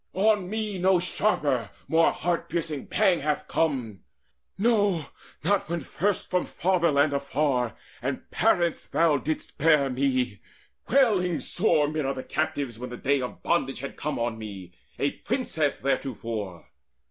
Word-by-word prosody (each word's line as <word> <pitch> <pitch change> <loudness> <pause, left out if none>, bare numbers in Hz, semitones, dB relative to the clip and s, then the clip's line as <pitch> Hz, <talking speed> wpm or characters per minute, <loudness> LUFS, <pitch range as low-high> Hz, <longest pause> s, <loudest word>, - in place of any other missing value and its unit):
On 205 -1 +2
me 215 -2 -2
No 185 0 +4
sharper, 150 - 0 0.2
more 165 +1 +4
heart 175 -1 -2
piercing 160 -4 -3
pang 195 -5 +3
hath 150 +1 -1
come 125 - -1 0.6
No, 205 -7 +2 0.4
not 195 0 +1
when 170 -1 -1
first 195 +8 -1
from 180 -1 +2
fatherland 165 -5 +2
afar 140 -4 0 0.3
And - - -3
parents 170 -2 +2
thou 155 0 +3
didst 155 +1 -4
bear 150 -3 +4
me, 125 -5 0 0.5
wailing 205 - +3
sore 165 -6 +2
Mid 155 0 -2
other 135 -1 -3
captives, 145 -7 -2
when 125 +1 -5
the 125 - -7
day 140 0 +1
of 125 - -6
bondage 135 -7 0
Had 140 - -6
come 150 +1 -3
on 115 -1 -2
me, 95 -5 -8 0.2
a 140 - +1
princess 160 - -1
theretofore. 115 -9 -3
150 Hz, 140 wpm, -26 LUFS, 130-180 Hz, 0.6 s, No